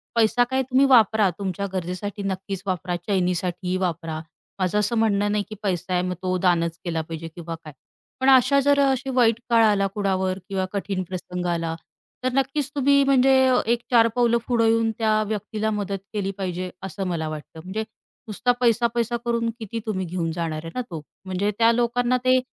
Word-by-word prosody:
पैसा 230 +1 +4
काय 265 0 +1
तुम्ही 260 +2 +3
वापरा 220 -5 +5
तुमच्या 195 0 -2
गरजेसाठी 185 +3 -4
नक्कीच 195 0 -4
वापरा, 180 -2 -2
चैनीसाठी 180 -1 0
वापरा 165 -3 -2 0.4
माझं 185 +2 +1
असं 210 +3 0
म्हणणं 205 -2 +2
नाही 210 0 +1
की 215 - -7
पैसा 185 -2 -1
आहे 180 - +2
मग 180 - -1
तो 185 0 0
दानच 170 -2 +1
केला 165 -2 -1
पाहिजे 165 +1 -7
किंवा 170 -1 -6
काय. 155 - -10 0.5
पण 260 +1 +3
अशा 265 +1 +6
जर 285 +1 +3
अशी 270 -1 +2
वाईट 230 -3 +4
काळ 230 -1 +5
आला 200 -2 +3
कुणावर 190 -2 0
किंवा 190 -1 -1
कठीण 195 -1 -2
प्रसंग 180 -1 -5
आला 165 -1 -1 0.5
तर 255 - +2
नक्कीच 275 +1 0
तुम्ही 280 0 +4
म्हणजे 270 -1 +4 0.4
एक 240 - +2
चार 230 -2 +6
पावलं 240 -1 +3
पुढे 235 -2 +2
येऊन 225 0 +3
त्या 215 -1 +2
व्यक्तीला 215 +1 -2
मदत 200 -2 -2 0.2
केली 200 -2 -1
पाहिजे 185 -1 -3
असं 195 +1 -4
मला 165 -3 -2
वाटतं, 155 +1 -8
म्हणजे 195 +5 -3 0.4
नुसता 225 +4 +1
पैसा-पैसा 235 0 +2
करून 235 -1 0
किती 225 +1 -5
तुम्ही 190 -4 -2
घेऊन 170 -1 -2
जाणार 160 -2 -3
आहे 165 +10 -4
तो. 160 -2 -5 0.2
म्हणजे 190 +2 -1
त्या 230 0 +5
लोकांना 240 +1 +1
ते, 255 0 +5
205 Hz, 180 wpm, -24 LUFS, 180-235 Hz, 0.5 s, अशा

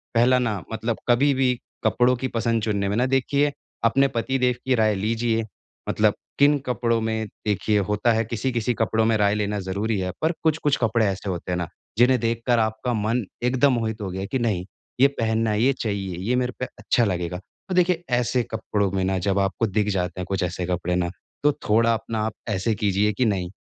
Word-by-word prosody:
पहला 125 +2 +5
ना 105 -7 -1
मतलब 110 0 -2
कभी 140 +4 +4
भी 130 -1 +2 0.3
कपड़ों 125 +1 +3
की 130 +2 -3
पसंद 115 -1 0
चुनने 100 -2 0
में 105 - -1
ना 125 - +3
देखिए 140 +2 +1 0.3
अपने 135 +4 +4
पति 130 +3 0
देव 125 -1 +2
की 130 -1 +3
राय 110 -2 +3
लीजिए 115 +2 0 0.5
मतलब - - +3 0.3
किन 145 +1 +5
कपड़ों 115 -2 +1
में 110 0 -1 0.2
देखिए 105 +1 +1
होता 105 +3 +2
है 110 +1 +1
किसी-किसी 120 +1 -1
कपड़ों 110 0 +1
में 115 -1 +3
राय 105 0 +2
लेना 105 -1 -1
ज़रूरी 100 +3 -2
है 90 0 -2
पर 160 +2 +2
कुछ-कुछ 155 -2 +2
कपड़े 115 -1 +2
ऐसे 95 0 -2
होते 90 0 -4
हैं 90 - 0
ना, 85 -2 -2 0.3
जिन्हें 125 +1 +5
देखकर 115 +1 +1
आपका 110 +3 -1
मन 110 +2 0 0.2
एकदम 130 +2 +3
मोहित 110 -2 -2
हो 95 - -3
गया 95 +1 -4
है 100 - -4
कि 130 - 0
नहीं, 100 -6 0 0.3
ये 135 - +7
पहनना 110 -1 +1
है, 105 +1 +1
ये 135 +2 +4
चाहिए 100 -7 -3
ये 125 - +3
मेरे 125 -1 0
पे 125 - -1
अच्छा 120 - +2
लगेगा। 90 -2 -2 0.3
तो 185 - -1
देखिए 175 -1 +2
ऐसे 125 0 +1
कपड़ों 105 -3 -1
में 95 -1 -1
ना 95 0 0
जब 100 +1 0
आपको 100 +3 0
दिख 105 +1 0
जाते 90 -1 -2
हैं - - -4
कुछ 95 -2 0
ऐसे 90 0 -2
कपड़े 90 0 -1
ना, 85 -1 0 0.3
तो 150 - +5 0.2
थोड़ा 115 +2 +4
अपना 110 0 -3
आप 110 - -2 0.2
ऐसे 105 +3 0
कीजिए 105 +1 +1
कि 125 +3 +1
नहीं 95 -5 0
110 Hz, 210 wpm, -24 LUFS, 100-125 Hz, 0.5 s, ये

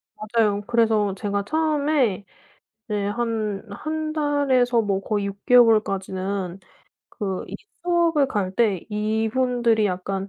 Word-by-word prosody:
맞아요. 215 -2 0
그래서 220 -4 +2
제가 200 -1 -2
처음에 295 -10 +1 0.6
이제 205 -1 -1
한 215 -2 -2
1 310 +7 -4
달에서 270 -6 +2
뭐 195 -2 -1
거의 205 0 -2
6 200 0 -7
개월까지는 195 -5 +2 0.5
그 195 -4 -4
이 - - -8 0.3
수업을 335 -5 +2
갈 195 -5 -2
때 205 -6 +1
이분들이 220 +2 +1
약간 195 +1 -3
215 Hz, 220 characters per minute, -23 LUFS, 200-250 Hz, 0.6 s, 그래서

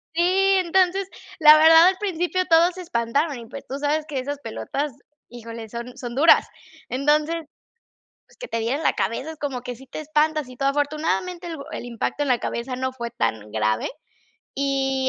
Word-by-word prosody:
Sí, 340 - +2 0.4
entonces, 375 +2 +2 0.3
la 305 0 +9
verdad, 325 +2 +8
al 375 - -3
principio 370 -2 -1
todos 340 +2 +4
se 370 - -7
espantaron, 280 +1 -1
y, 230 - -10
pues, - - -10
tú 270 - -4
sabes 300 +1 0
que 280 -3 -3
esas 285 +2 -4
pelotas, 275 - -4 0.3
híjole, 230 -1 -9
son 235 +3 -8
son 245 -2 -6
duras. 320 +4 +6 0.4
Entonces, 295 +5 +1 0.9
pues, - - -23
que - - -8
te 230 - -2
diera 230 +4 -1
en 310 - -4
la - - +4
cabeza, 265 +7 -2
es 315 - -11
como 270 -4 -3
que 245 -1 -7
sí 265 0 -15
te - - -7
espantas 305 -2 0
y 250 - -12
todo. 275 - 0
Afortunadamente, 305 +5 -1
el 335 - -5
bo 280 -2 -10
el - - -6
impacto 240 +5 -2
en - - -3
la 245 - +3
cabeza 245 +2 -4
no 260 +1 -2
fue 235 -2 -6
tan 110 - -3
grave, 110 0 0 0.7
y 270 -1 0
280 Hz, 195 wpm, -23 LUFS, 245-320 Hz, 0.9 s, la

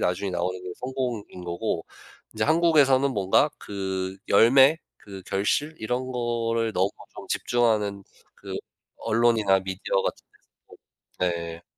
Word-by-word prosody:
나중에 90 +2 -1
나오는 90 +1 -2
게 90 - -7
성공인 125 -8 -4
거고, 85 0 -3 0.5
인제 110 - -2
한국에서는 145 -4 +4
뭔가 100 +9 +3
그 95 -1 -4
열매, 130 +9 +6 0.2
그 95 -2 -11
결실 145 +11 0
이런 125 +3 -2
거를 115 -2 -1
너무 95 +2 +1 0.3
좀 - - -9
집중하는 105 -5 +1 0.3
그 - - -8 0.4
언론이나 110 -4 +3
미디어 95 0 -2
같은 - - -4 0.4
데서 - - -16 0.6
네. 85 0 -7
110 Hz, 260 characters per minute, -25 LUFS, 95-125 Hz, 0.6 s, 열매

